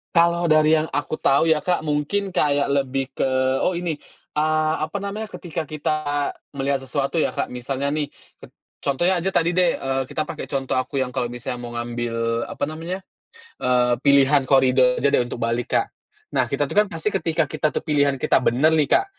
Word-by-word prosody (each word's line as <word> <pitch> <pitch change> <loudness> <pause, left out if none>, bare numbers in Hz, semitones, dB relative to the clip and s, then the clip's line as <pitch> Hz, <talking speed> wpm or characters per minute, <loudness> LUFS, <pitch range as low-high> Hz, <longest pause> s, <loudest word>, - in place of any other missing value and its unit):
Kalau 170 +1 +4
dari 155 -1 +5
yang 155 - 0
aku 145 +2 -2
tahu 140 +4 +3
ya, 160 - +4
Kak, 180 +3 0
mungkin 155 +7 -1
kayak 145 -5 +1
lebih 135 -1 0
ke - - +1 0.4
oh 185 - +2
ini, 170 -3 -2 0.4
ah, 155 +1 +2
apa 175 +6 -5
namanya, 200 +2 -4
ketika 170 -6 -6
kita 150 -1 -1 0.2
melihat 135 -1 -1
sesuatu 140 +4 -2
ya, 160 - +1
Kak. 140 - -2
Misalnya 130 +3 -3
nih 145 -1 -2 0.2
ket - - -15 0.2
contohnya 175 +7 +1
aja 185 +3 -2
tadi 170 +1 +1
deh, 180 -2 +4
eee, 135 0 -2
kita 140 - -3
pakai 155 - -5
contoh 135 -2 -2
aku 135 +1 -1
yang 130 - -1
kalau 125 - -2
misalnya 120 0 -5
mau 120 -1 -7
ngambil, 115 -1 -2
apa - - -6
namanya, 165 +4 -5 0.6
eee, 125 -1 +3
pilihan 140 0 +5
koridor 130 -2 +4
aja 140 0 +1
deh - - +4
untuk 120 0 -4
balik, 115 +1 -1
Kak. 400 - -2 0.4
Nah, - - +1
kita - - 0
itu - - -6
kan 210 - -2
pasti 165 +6 -3
ketika 165 -4 +1
kita 155 +1 -1
itu - - -2
pilihan 145 -3 +2
kita 130 - +2
bener 135 +6 +3
nih, 155 -3 +2
Kak, 390 - +4
145 Hz, 195 wpm, -22 LUFS, 135-160 Hz, 0.6 s, dari